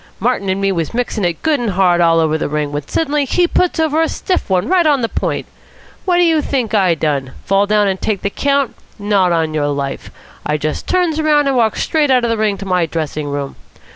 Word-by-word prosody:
Martin 210 -3 0
and 190 +1 0
me 195 0 +1
was 170 +3 -3
mixing 235 -3 -2
it 170 -2 -2
good 310 -3 +2
and 240 -2 -1
hard 180 -2 +3
all 165 -1 +4
over 160 -1 +1
the 160 - -2
ring, 150 -1 -2
when 145 0 -5
suddenly 295 -2 0
he 350 +6 +1
puts 350 -1 0
over 315 0 +2
a 325 - +1
stiff 370 - -2
one 185 0 +1
right 355 -2 +3
on 285 -3 +3
the - - +2
point. - - -3 0.6
What 360 -2 +2
do 355 - +4
you 325 -3 +3
think 250 -7 -2
I 190 -5 +3
done? 140 -4 -2
Fall 195 +1 +2
down 210 0 +2
and 190 -1 -2
take 210 -3 -2
the 200 - -1
count? 280 0 0 0.2
Not 200 -3 +1
on 160 -2 0
your 150 -2 0
life. 140 -1 -4 0.3
I 150 +1 -1
just 155 +1 -4
turns 345 -4 +1
round 300 -2 +3
and 275 - +1
walks 225 -3 +1
straight 305 -3 +1
out 255 -2 +3
of 235 - +1
the 230 - 0
ring 210 -2 0
to 195 - -7
my 180 -3 +1
dressing 155 -2 -3
room. 140 -1 -4
200 Hz, 240 wpm, -16 LUFS, -, 0.6 s, all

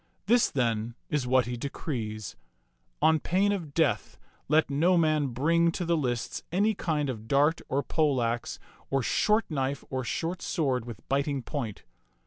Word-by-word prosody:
This, 235 +4 +4
then, 115 -3 -1 0.2
is 145 -4 0
what 130 -1 +4
he 120 +1 -3
decrees: 110 - -4 0.7
On 160 0 +5
pain 195 +6 +2
of 170 -8 -4
death 165 - +1 0.3
let 155 +2 +4
no 165 +6 +3
man 155 -3 +2
bring 165 +7 +2
to 175 - -2
the 170 0 +2
lists 125 -6 -2
any 205 +5 +2
kind 155 -7 -1
of 110 -4 -5
dart 145 +6 +3
or 140 +2 0
pole 150 -5 +1
axe 120 0 -1 0.3
or 135 -2 +1
short 215 - +2
knife 135 -1 -1
or 130 -1 -1
short 170 +8 -3
sword 130 -8 0
with 120 -2 -10
biting 140 -1 0
point. 115 -7 -5
140 Hz, 160 wpm, -28 LUFS, 125-165 Hz, 0.7 s, On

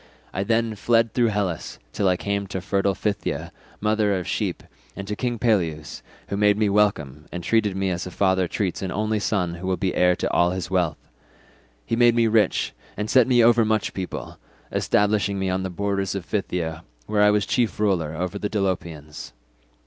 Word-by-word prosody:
I 95 - -1
then 115 +1 +1
fled 115 +1 +2
through 120 -2 +3
Hellas 100 -6 -2 0.2
till 100 -1 +1
I 90 - +2
came 100 0 -2
to 95 0 -4
fertile 100 0 0
Phthia, 105 -2 -2 0.3
mother 105 -2 +1
of 90 - -5
sheep, - - -2 0.3
and 100 - -7
to 105 - -2
King 120 +1 -2
Peleus, 85 -10 0 0.3
who - - -2
made 105 0 +4
me 105 -1 +2
welcome 80 -9 +1
and 90 -1 -5
treated 105 -2 +1
me 95 -1 0
as 90 0 -3
a - - -5
father 95 0 +1
treats 95 0 -2
an 95 -1 -3
only 110 +1 0
son 90 -4 0
who 85 +2 -6
will 95 -1 0
be 95 -2 -1
heir 90 0 +3
to - - -2
all 85 0 +3
his 90 0 -4
wealth. 90 -5 +1 0.9
He - - -1
made 120 0 +5
me 115 -1 +4
rich 110 -1 +2 0.2
and 105 +1 -2
set 130 -2 +5
me 120 -2 +5
over 120 0 +5
much 110 -1 0
people, 95 -2 -6 0.3
establishing 105 -1 +1
me 95 -1 -1
on 95 +1 -1
the 95 - -3
borders 100 +1 -2
of 95 -3 -4
Phthia 85 -6 -2 0.2
where 105 - +1
I 105 - +6
was 105 -2 +2
chief 120 +2 0
ruler 90 -7 +1
over 90 +2 -3
the 105 - -2
Dolopians. 85 - -3
100 Hz, 195 wpm, -24 LUFS, 90-105 Hz, 0.9 s, I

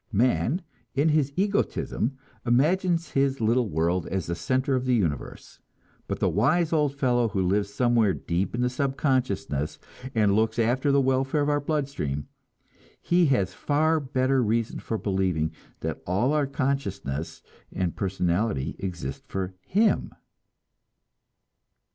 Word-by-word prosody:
Man, 125 - +1 0.3
in 145 +4 +3
his 150 -3 +2
egotism, 190 - 0 0.3
imagines 165 +7 +2
his 135 0 +1
little 115 +1 +2
world 85 +3 0
as 95 -3 -2
the 85 - -2
center 130 - 0
of 130 -1 0
the 125 -1 +3
universe; 85 -10 -3 0.5
but - - -2
the - - +1
wise 170 -2 +2
old 150 -3 +2
fellow 125 -4 +2
who 100 -3 -1
lives 100 +2 +1
somewhere 120 -3 +3
deep 90 +5 -2
in 125 - 0
our 125 - +2
subconsciousness 130 - -1 0.4
and 105 -3 +3
looks 110 +1 +1
after 125 +5 +2
the 140 - +4
welfare 135 +2 +1
of 145 - 0
our 145 0 +2
blood 145 -1 0
stream 70 - -4 0.7
he 175 -1 +3
has 100 -9 +1
far 155 +6 +1
better 130 -1 +1
reason 115 0 0
for 110 - -3
believing 95 -6 0 0.3
that - - -3
all 105 +11 +1
our 150 -2 +2
consciousness 100 - -3 0.3
and 90 -2 -1
our - - -21
personality 90 -4 -1
exist 85 -8 -5
for 95 -1 -3
him! 210 +3 +2
120 Hz, 140 wpm, -26 LUFS, 95-140 Hz, 0.7 s, the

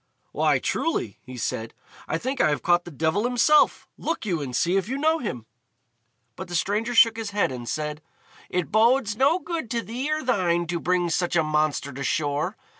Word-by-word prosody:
"Why, - - +2
truly," 120 - -2
he 130 -1 -10
said, 115 -1 -3 0.3
"I - - -1
think 260 +8 -2
I - - +4
have 145 - -1
caught 175 0 +3
the - - -7
devil 160 +7 0
himself. 250 +5 +3
Look 330 - -3
you 175 -6 -1
and 130 -3 -4
see 175 +7 +2
if 195 +2 0
you 265 - -2
know 315 +3 +2
him." 125 - -5 0.9
But 190 - -7
the 175 - -5
stranger 215 +7 0
shook 230 -1 +6
his 225 -2 -4
head, 205 -7 0
and 120 -2 -6
said, 150 +1 -3 0.5
"It 180 -2 -2
bodes 225 0 +3
no 275 +8 +3
good 325 -6 -5
to 235 0 -1
thee 255 +7 -4
or 310 0 -1
thine 175 -8 +1
to 170 0 -1
bring 175 0 0
such 175 +1 0
a 160 - +4
monster 150 -2 0
to 140 +2 -5
shore. 150 +6 -1
180 Hz, 200 wpm, -25 LUFS, 155-240 Hz, 0.9 s, shook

